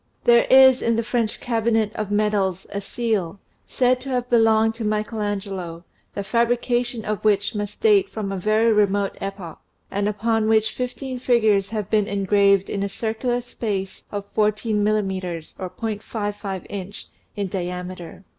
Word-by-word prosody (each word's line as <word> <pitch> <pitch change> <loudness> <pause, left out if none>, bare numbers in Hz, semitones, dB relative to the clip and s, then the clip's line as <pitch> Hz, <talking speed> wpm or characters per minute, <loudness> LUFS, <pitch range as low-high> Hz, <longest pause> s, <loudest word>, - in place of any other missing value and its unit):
There 235 0 +5
is 260 -1 +7
in 230 0 +1
the 230 - 0
French 230 -2 -1
Cabinet 225 -2 0
of 215 -2 -4
Medals 205 -3 0
a 200 - -3
seal, 205 -4 -2 0.3
said 250 0 +2
to 270 - -7
have 250 -1 -2
belonged 225 -1 +4
to 225 0 -6
Michael 215 +1 -1
Angelo, 190 -5 -4 0.3
the 200 - -2
fabrication 240 +1 0
of 210 -2 -3
which 205 0 +2
must 205 -1 -5
date 415 -3 +4
from 210 -3 -4
a 195 - -3
very 215 +4 +3
remote 200 -1 +1
epoch, 195 -4 -6 0.3
and 200 +1 0
upon 220 +1 0
which 220 0 +3
fifteen 255 +2 -5
figures 220 -6 +2
have 210 -3 -4
been 210 -2 +2
engraved 200 0 +3
in 200 - -3
a 200 - -1
circular 230 +4 -2
space 200 -5 -4
of 205 -1 -4
fourteen 215 0 +1
millimeters 190 -6 -2
(.55 205 0 -4
inch) 200 0 -7 0.3
in 205 - -2
diameter. 180 -1 -5
210 Hz, 155 wpm, -23 LUFS, 195-230 Hz, 0.3 s, is